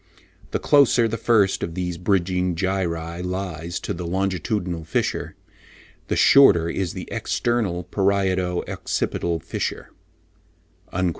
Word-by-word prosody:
The - - -1
closer 135 -5 +4
the 115 - -3
first 110 -5 +2
of 85 - -4
these 90 -2 -3
bridging 90 -1 +1
gyri 85 -2 -2
lies 90 -2 -4
to - - -3
the 90 - -6
longitudinal 95 -1 -2
fissure, 80 - -2 0.7
the - - 0
shorter 95 -12 +6
is 90 0 -2
the - - -7
external 110 -7 -1
parieto 95 -2 0
occipital 85 -1 -2
fissure" 80 - -4 1.0
(loc. 95 - -1
90 Hz, 120 wpm, -23 LUFS, 85-100 Hz, 1.0 s, shorter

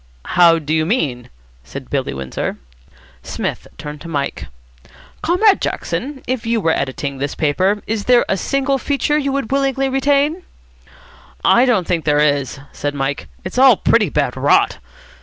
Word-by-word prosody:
"How 170 -2 +6
do 155 -1 -3
you 160 0 +2
mean?" 150 - -1 0.3
said - - -9
Billy - - -1
Windsor. 65 -1 -4 0.6
Psmith - - -4
turned 150 0 -8
to 170 - -9
Mike. 145 -4 -3 0.7
"Comrade 385 +5 +3
Jackson, 270 +1 -3
if 255 -2 -2
you 230 0 0
were 165 -5 +1
editing 135 -1 -3
this 140 +1 -3
paper, 185 +7 +1
is 215 -1 -3
there 245 -1 +4
a - - +1
single 275 +5 0
feature 290 +3 0
you 275 -2 -1
would 275 -4 -3
willingly 270 -1 +1
retain?" 285 +5 +1 1.0
"I 240 +2 +5
don't 215 -8 +2
think 170 -2 -1
there 150 -1 +2
is," 145 -3 +1
said 145 0 -4
Mike. 135 0 -3 0.2
"It's 185 +7 -3
all 260 -5 +7
pretty 215 -6 +2
bad - - -1
rot." - - +2
200 Hz, 160 wpm, -18 LUFS, -, 1.0 s, all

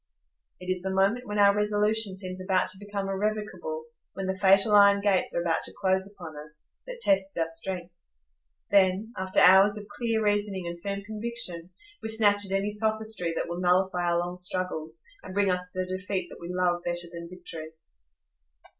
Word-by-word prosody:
It 180 - -10
is 185 -1 -2
the 190 - -3
moment 195 +6 +1
when 210 0 -3
our 200 0 +5
resolution 210 -1 +1
seems 185 -1 -6
about 185 -1 +1
to 190 +2 -4
become 200 -1 -4
irrevocable—when 190 -5 -4
the 190 0 -1
fatal 195 +2 +4
iron 200 -1 +7
gates 200 -2 +1
are 170 - +1
about 165 -1 0
to - - -8
close 190 0 +1
upon 170 -6 -10
us—that 150 - -12
tests 195 - +1
our 165 -1 +1
strength. 175 +1 -6 0.8
Then, 200 +3 +3
after 190 0 0
hours 195 +3 +6
of 210 - -7
clear 230 -2 -1
reasoning 205 -3 0
and 170 0 -6
firm 200 +1 -4
conviction, 210 -5 -3 0.3
we 220 - -5
snatch 205 -2 +5
at - - -6
any 195 +2 0
sophistry 220 -4 -1
that - - -2
will 170 +1 -5
nullify 180 0 +1
our 170 - +2
long 175 +1 -3
struggles, 180 -3 -2 0.2
and 185 - -10
bring 200 -2 +2
us 180 0 -2
the 185 0 -1
defeat 185 0 -4
that - - -12
we 170 - -7
love 180 -1 0
better 175 0 -3
than 170 0 -8
victory. 165 -3 -9
190 Hz, 180 wpm, -27 LUFS, 175-205 Hz, 0.8 s, iron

